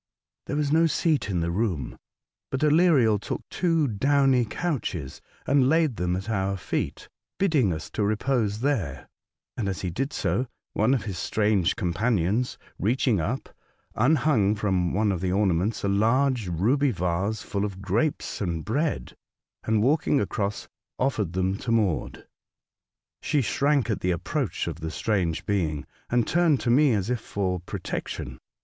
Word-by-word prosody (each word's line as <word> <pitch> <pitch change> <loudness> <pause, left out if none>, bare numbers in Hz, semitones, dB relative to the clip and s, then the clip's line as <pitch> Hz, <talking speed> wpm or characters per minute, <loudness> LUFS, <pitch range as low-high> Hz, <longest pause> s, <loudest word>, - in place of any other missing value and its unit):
There - - -2
was 145 -1 0
no 165 +2 +5
seat 155 - +1
in 90 -3 0
the 85 0 -1
room; 90 - -1 0.5
but 130 - -3
Aleriel 150 - +4
took - - -4
two 165 -4 +1
downy 135 +2 +3
couches 110 - -3 0.2
and 135 -1 +3
laid 160 -6 +2
them 90 0 0
at 95 +1 -5
our 100 -3 -1
feet, - - -3 0.3
bidding 150 - +2
us 80 -2 -5
repose 110 0 0
there, 95 - -1 0.5
and, 105 -4 -2
as 90 -5 -4
he 90 - -2
did 135 - -2
so. - - -1
Jiingfrau, 125 0 -4
205 - - -7
one 110 +5 +4
of 120 - -2
his 95 -4 -5
strange 105 -4 +1
companions, 100 +5 0 0.2
reacliing 115 +1 +2
up, 125 +11 -3 0.4
unhung 125 -5 +3
from 95 -4 0
one 105 +1 +1
of 90 -3 -2
the 95 -1 0
ornaments 95 +1 +1
a - - +1
large 115 +3 +2
ruby 120 - +2
vase 95 +1 -1
full 100 -1 -2
of 100 -2 -4
grapes 105 +11 -1
and 85 -5 -2
bread, 145 +8 -1 0.5
and, 110 -1 +2
walking 145 +1 +2
across, 100 -1 -2 0.3
offered 110 -10 0
them 95 +1 0
to 115 - -3
Maude. 105 -8 0 1.0
She 145 - +1
shrank 140 -1 +1
at 105 - -1
the 90 - -1
approach 100 - -1
of 85 -1 -5
the 80 0 -4
strange 90 -3 -1
being, 80 -8 -1 0.2
and 120 -2 +2
turned 170 -5 +3
to 120 - +1
me 140 +1 +5
as 105 +2 -1
if 125 - 0
for 95 -4 -2
protection. 60 -7 -5
110 Hz, 160 wpm, -26 LUFS, 95-135 Hz, 1.0 s, no